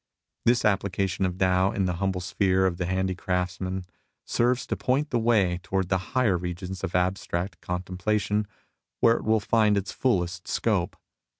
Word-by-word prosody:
This 120 Hz, +1 st, +3 dB
application 95 Hz, -2 st, +1 dB
of 90 Hz, 0 st, -5 dB
Tao 95 Hz, 0 st, +3 dB
in 95 Hz, -, 0 dB
the 90 Hz, -2 st, -1 dB
humble 95 Hz, -2 st, 0 dB
sphere 95 Hz, +1 st, +1 dB
of 90 Hz, -2 st, 0 dB
the 90 Hz, -, -2 dB
handicrafts 95 Hz, -1 st, -1 dB
man 95 Hz, 0 st, -3 dB, 0.4 s
serves 120 Hz, +2 st, +1 dB
to -, -, -2 dB
point 140 Hz, +4 st, 0 dB
the 120 Hz, -, +2 dB
way 105 Hz, -6 st, +2 dB
towards 95 Hz, 0 st, -1 dB
the 95 Hz, -, +2 dB, 0.2 s
higher 105 Hz, -9 st, +3 dB
regions 90 Hz, +2 st, -5 dB
of 90 Hz, -2 st, -3 dB
abstract 90 Hz, 0 st, -1 dB
contemplation, 100 Hz, +4 st, -1 dB, 0.5 s
where 115 Hz, 0 st, +5 dB
it -, -, -6 dB
will 110 Hz, 0 st, +3 dB
find 105 Hz, -1 st, +3 dB
its 100 Hz, +1 st, -2 dB
fullest 90 Hz, -7 st, -1 dB
scope. 100 Hz, -4 st, 0 dB
95 Hz, 165 wpm, -26 LUFS, 90-105 Hz, 0.5 s, where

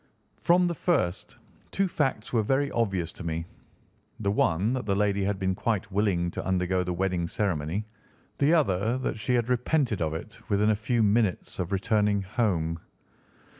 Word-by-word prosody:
"From 180 Hz, +1 st, +4 dB
the 175 Hz, -, 0 dB
first, 145 Hz, -, -1 dB, 0.3 s
two 195 Hz, 0 st, +1 dB
facts 135 Hz, -10 st, -1 dB
were 115 Hz, -, +3 dB
very 135 Hz, +6 st, +1 dB
obvious 95 Hz, -8 st, 0 dB
to -, -, -10 dB
me, 80 Hz, 0 st, -3 dB, 0.7 s
the 100 Hz, -2 st, 0 dB
one 100 Hz, +3 st, +2 dB
that 125 Hz, -5 st, -3 dB
the 100 Hz, -, +2 dB
lady 100 Hz, -1 st, +1 dB
had 100 Hz, 0 st, 0 dB
been 95 Hz, -1 st, 0 dB
quite 105 Hz, +1 st, -2 dB
willing 95 Hz, -4 st, +1 dB
to -, -, -5 dB
undergo 90 Hz, 0 st, +1 dB
the 90 Hz, -, -3 dB
wedding 90 Hz, -1 st, -1 dB
ceremony, 90 Hz, +1 st, -1 dB, 0.5 s
the 145 Hz, +2 st, +4 dB
other 115 Hz, -, +2 dB
that 130 Hz, -4 st, -3 dB
she 125 Hz, +4 st, 0 dB
had 120 Hz, -2 st, +1 dB
repented 125 Hz, -, +1 dB
of 80 Hz, -1 st, -1 dB
it 105 Hz, +7 st, -8 dB
within 105 Hz, +1 st, +3 dB
a -, -, +2 dB
few 110 Hz, +2 st, 0 dB
minutes 105 Hz, -3 st, +1 dB
of 90 Hz, 0 st, -2 dB
returning 105 Hz, 0 st, +1 dB
home. 90 Hz, -6 st, -1 dB
105 Hz, 170 wpm, -27 LUFS, 90-120 Hz, 0.7 s, From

